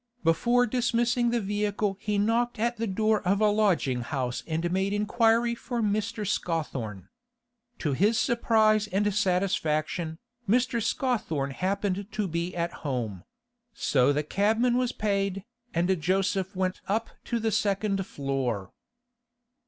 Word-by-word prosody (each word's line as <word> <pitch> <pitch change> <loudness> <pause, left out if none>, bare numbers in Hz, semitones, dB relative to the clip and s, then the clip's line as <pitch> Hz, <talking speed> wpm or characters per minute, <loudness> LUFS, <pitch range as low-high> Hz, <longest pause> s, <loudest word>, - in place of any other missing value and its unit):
Before 240 +10 +3
dismissing 240 0 +1
the 240 0 +1
vehicle 205 0 -1
he 210 -2 -1
knocked 230 +4 +1
at 235 +2 0
the 230 +1 -2
door 215 +2 +1
of 195 +3 +1
a 215 -1 +4
lodging 180 - +2
house 125 0 -3
and 165 +1 -1
made 190 +2 0
inquiry 225 +3 +2
for 240 +1 -4
Mr. 215 0 -1
Scawthorne. 135 - -3 0.7
To 150 -4 -1
his 205 - +3
surprise 220 -3 +3
and 205 +1 0
satisfaction, 175 -4 0 0.3
Mr. 245 +1 +2
Scawthorne 210 - -1
happened 195 +4 -1
to 210 -2 -1
be 170 +1 -3
at 170 0 -2
home; 115 - -3 0.5
so 130 - +3
the 150 +1 0
cabman 220 +9 +2
was 250 -1 +1
paid, 195 -2 -1 0.3
and 175 +1 +1
Joseph 190 +2 0
went 185 0 -1
up 220 +3 -1
to 235 - -1
the 220 0 0
second 200 -2 0
floor. 130 -9 -2
200 Hz, 135 wpm, -27 LUFS, 170-225 Hz, 0.7 s, a